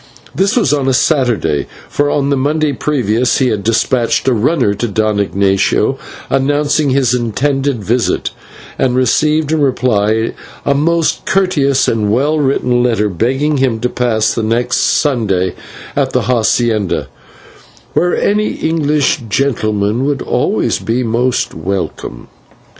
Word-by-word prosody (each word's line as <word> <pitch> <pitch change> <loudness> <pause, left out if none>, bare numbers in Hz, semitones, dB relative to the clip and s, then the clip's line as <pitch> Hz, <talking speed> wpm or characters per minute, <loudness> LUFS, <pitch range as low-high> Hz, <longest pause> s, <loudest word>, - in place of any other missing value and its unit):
This 195 +2 +1
was 160 - +2
on 140 -2 0
a 130 - +2
Saturday, 125 - +1 0.2
for 145 0 0
on 140 -1 0
the - - +3
Monday 145 +2 0
previous 125 -5 0
he 130 -2 +2
had 105 -3 -2
despatched 115 +3 +1
a 130 - +4
runner 120 -1 +1
to 120 +4 -3
Don 110 0 0
Ignatio 100 -1 +1 0.3
announcing 145 +2 +1
his 130 -2 +2
intended 130 +1 -1
visit, 120 +4 0 0.5
and 125 -2 +1
received 150 +4 +1
in 160 -1 +1
reply 115 -5 +1 0.3
a 140 - +3
most 165 +3 0
courteous 150 -8 +2
and 105 -2 0
well 145 +7 +1
written 125 -3 +1
letter, 115 -4 +1
begging 135 - 0
him 130 -4 0
to 125 - 0
pass 115 -4 0
the 115 - -2
next 120 +3 0
Sunday 100 - +1 0.4
at - - 0
the - - +2
/hacienda/, 115 -4 0 0.9
"where 175 0 +1
any 210 +1 +1
English 155 -2 0
gentleman 110 -2 0
would 140 -2 -1
always - - 0
be 120 +3 -1
most 120 +2 0
welcome." 85 -8 -5
125 Hz, 135 wpm, -14 LUFS, 110-145 Hz, 0.9 s, a